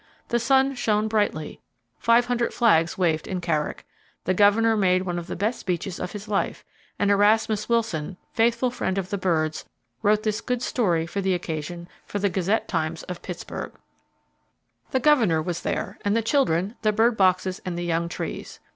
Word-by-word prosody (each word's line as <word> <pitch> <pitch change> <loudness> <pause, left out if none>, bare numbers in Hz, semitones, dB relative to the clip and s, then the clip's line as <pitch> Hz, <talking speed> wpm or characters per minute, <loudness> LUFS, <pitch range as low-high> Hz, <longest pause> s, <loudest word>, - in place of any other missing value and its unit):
The 235 - +2
sun 270 +3 +3
shone 215 -4 +1
brightly, 205 -8 -1 0.4
500 240 0 +2
flags 170 -8 +3
waved 165 -4 +1
in 185 - -2
Carrick, 160 -4 -2 0.4
the 185 - +1
Governor 210 +4 +4
made 185 -3 +3
one 175 -2 -2
of 170 - -8
the - - -4
best 215 +6 -1
speeches 180 0 -3
of 180 - -4
his 210 0 -7
life, 205 -1 -2 0.3
and 200 0 +2
Erasmus 210 +1 +3
Wilson, 190 -7 -1 0.2
faithful 235 +2 +2
friend 190 -5 -2
of 190 +1 -3
the 200 - -1
birds, 160 -4 0 0.4
wrote 210 +1 +3
this 215 0 -1
good 250 +1 -2
story 175 -12 +1
of 185 +4 -4
the 190 -1 +2
occasion 170 0 -5 0.2
for - - -3
the 200 0 +1
Gazette 195 +4 0
Times 160 -2 -2
of 180 -1 -7
Pittsburgh: 180 -2 -6 1.2
The 260 - +1
Governor 240 - +4
was 170 +2 -3
there, - - -3
and 205 +2 +2
the 230 - 0
children, 210 - +1
the 215 - +3
bird 225 +2 +3
boxes, 185 -1 +2
and 180 -2 -4
the 175 - -3
young 170 0 0
trees. - - -6
200 Hz, 175 wpm, -25 LUFS, 175-225 Hz, 1.2 s, Governor